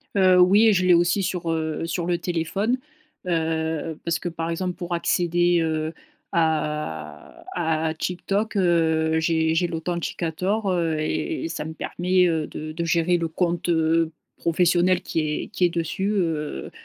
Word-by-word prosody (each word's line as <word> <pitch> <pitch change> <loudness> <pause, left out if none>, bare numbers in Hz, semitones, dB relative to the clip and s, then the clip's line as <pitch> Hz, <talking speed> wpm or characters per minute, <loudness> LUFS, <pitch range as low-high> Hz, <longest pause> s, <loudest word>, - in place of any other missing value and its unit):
Heu, 185 -2 +5
oui 205 +4 +6
je 185 -1 +2
l'ai 180 - +6
aussi 175 +3 +3
sur, 175 -2 -2
heu, 160 0 -2
sur 170 0 -2
le 175 -1 +1
téléphone, 180 +8 -1 0.5
heu, 160 -2 -1
parce 165 -1 -1
que - - -5
par 165 0 -4
exemple, 180 +2 -2
pour 175 -1 -5
accéder, 175 0 +2
heu, 160 0 -1 0.4
à 150 - -2
à 160 -2 0
à 160 - -1
TikTok, 195 +6 -2
heu, 160 -3 +2
j'ai 160 0 +1
j'ai 175 +1 +2
l'Authenticator, 175 +4 -2
heu 165 -3 0
et 320 - -2
et 330 - -3
ça 150 - -4
me 160 - -6
permet, 180 +2 +1
heu, 160 -2 0
de 155 0 -7
de 170 - -3
gérer 170 +1 +2
le 165 - -1
compte, 175 +1 -1
heu, 165 0 +2 0.3
professionnel 175 +1 +2
qui - - -2
est 150 -1 -2
qui 195 - -3
est - - +3
dessus, 170 +4 -2
heu 165 -7 -2
170 Hz, 165 wpm, -24 LUFS, 160-180 Hz, 0.5 s, oui